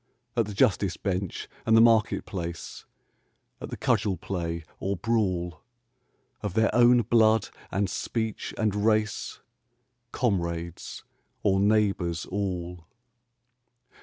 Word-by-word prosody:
At 115 -3 +1
the 105 - -6
justice 100 -6 +2
bench 95 -2 -3 0.2
and 110 0 +4
the - - +8
market 115 -2 +4
place, 85 -3 -6 0.8
At - - -6
the - - -6
cudgel 95 -3 +1
play 85 -1 -4 0.2
or 100 0 -2
brawl, 90 -6 -1 0.8
Of 105 -4 -4
their 110 0 +3
own 120 0 +6
blood 110 0 +3 0.2
and 100 +1 0
speech 110 +4 -3
and 110 -3 +1
race, 110 -1 0 0.7
Comrades 85 -6 -2 0.4
or 95 -2 +3
neighbours 100 -5 +1
all 90 -3 -4
100 Hz, 110 wpm, -27 LUFS, 90-110 Hz, 0.8 s, the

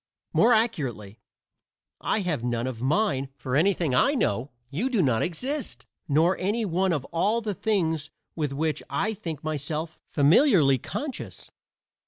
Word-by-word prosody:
More 240 - +5
accurately, 140 - 0 0.8
I 215 - 0
have 165 -10 -2
none 120 -1 -1
of 125 -3 -5
mine; 140 - +1
for 130 -1 -3
anything 170 -2 +2
I 275 - +3
know, 120 - 0 0.2
you 200 - -1
do 240 -5 0
not 125 -5 +2
exist, 260 - -4 0.2
nor 160 +5 +3
any 215 +4 0
one 185 +1 +1
of 145 -5 -1
all 205 +7 +2
the 215 -3 -3
things 160 -8 0 0.3
with 150 -4 -1
which 155 +2 -1
I 215 +2 0
think 165 -7 -6
myself 155 +1 -3
familiarly 150 - +4
conscious. 275 - -6
160 Hz, 145 wpm, -26 LUFS, 140-210 Hz, 0.8 s, More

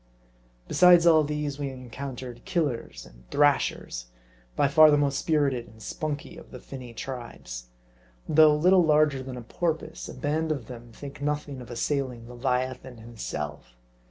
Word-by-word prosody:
Besides 180 -1 +6
all 160 -2 +6
these, 150 -1 -3
we 140 -1 -2
encountered 125 -1 -8
Killers 150 -9 -2
and - - -19
Thrashers, 145 - +1 0.5
by - - +3
far 155 +2 +7
the 145 - +5
most 140 -1 +1
spirited 140 -6 +1
and 110 - -17
"spunky" 150 +6 -5
of - - -13
the 125 - -9
finny 130 -2 -9
tribes. 115 - -7 0.6
Though 155 -1 +6
little 180 +4 +5
larger 150 -3 +3
than 130 -1 -7
a 120 - -7
porpoise; 160 +4 -3
a - - -8
band 155 +2 -1
of 140 -7 -3
them 120 -1 -10
think 140 +4 -10
nothing 145 -2 -2
of 120 - -11
assailing 125 -1 -2
leviathan 125 0 -2
himself. 75 - -7
135 Hz, 150 wpm, -27 LUFS, 120-150 Hz, 0.6 s, far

